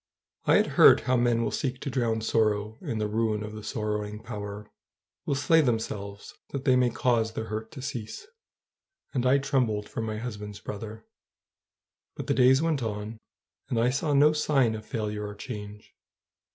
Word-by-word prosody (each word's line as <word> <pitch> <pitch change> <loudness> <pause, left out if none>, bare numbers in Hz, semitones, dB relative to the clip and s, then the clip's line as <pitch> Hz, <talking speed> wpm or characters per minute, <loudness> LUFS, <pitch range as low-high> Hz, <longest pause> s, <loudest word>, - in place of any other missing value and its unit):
I - - +5
had - - +5 0.2
heard - - +9
how 130 - +1
men 120 -1 +2
will 110 - -1
seek 130 +2 -2
to 140 - -3
drown 115 -3 0
sorrow 110 -1 0
in 115 - -3
the 105 -1 0
ruin 110 0 0
of 105 0 -7
the 110 - -7
sorrowing 105 -1 -3
power, 105 -2 -6 0.6
will 140 - +1
slay 160 +4 +4
themselves 105 -6 -3 0.2
that 140 -1 -5
they 130 -3 +5
may 125 -1 +4
cause 115 -2 +1
their 110 0 -5
hurt 110 +1 -4
to 130 - -8
cease, 130 - -5 0.9
and 130 -2 +1
I 135 +2 +5
trembled 125 -7 0
for - - -5
my 110 -1 -3
husband's 105 -3 -6
brother. 110 +1 -7 1.1
But - - -5
the - - +1
days 130 +3 +5
went 160 -4 +1
on, 110 0 -4 0.5
and 115 - 0
I 120 +2 +3
saw 145 +2 0
no 150 +2 +6
sign 140 -6 +2
of 110 0 -7
failure 105 -2 -3
or 105 - -8
change. 105 -2 -8
110 Hz, 180 wpm, -27 LUFS, 105-125 Hz, 1.1 s, heard